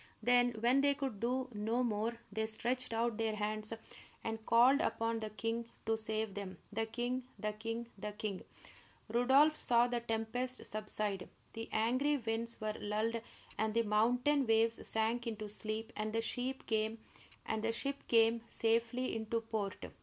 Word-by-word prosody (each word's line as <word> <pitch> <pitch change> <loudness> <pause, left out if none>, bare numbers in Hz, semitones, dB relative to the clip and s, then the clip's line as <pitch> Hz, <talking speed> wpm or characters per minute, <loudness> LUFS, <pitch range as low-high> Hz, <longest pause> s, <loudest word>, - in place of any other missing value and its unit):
Then, 245 0 +5
when 250 +4 +4
they 285 0 +4
could 270 -7 -3
do 255 +3 0
no 220 +4 0
more, 225 0 -1
they 220 +1 -1
stretched 245 +3 0
out 230 -1 0
their 225 -1 0
hands 215 +1 -2 0.5
and 225 0 -3
called 250 +5 +6
upon 230 -5 0
the 215 -1 -4
king 230 +2 -3 0.2
to 225 - +2
save 220 -1 -2
them, 190 -2 -6 0.2
the 225 +1 0
king, 245 +3 -1 0.2
the 215 -1 -2
king, 225 +2 -4
the 210 +1 -3
king! 205 -2 -4 0.7
Rodolph 265 +7 +5
saw 240 -3 +4
the 245 -1 0
tempest 235 +3 -2
subside. 210 -2 -2 0.2
The 225 0 -6
angry 255 +7 +2
winds 230 -1 -3
were 215 0 -1
lulled, 220 +2 -1 0.4
and 220 0 +1
the 230 - +4
mountain 245 +6 +3
waves 225 +1 +3
sank 225 +2 0
into 215 -2 -3
sleep, 215 +2 -4
and 215 0 -2
the 225 - +2
ship 255 +3 -2
came 225 +2 0
safely 230 +2 +1
into 225 +1 -1
port. 215 -4 -3
225 Hz, 150 wpm, -35 LUFS, 215-245 Hz, 0.7 s, called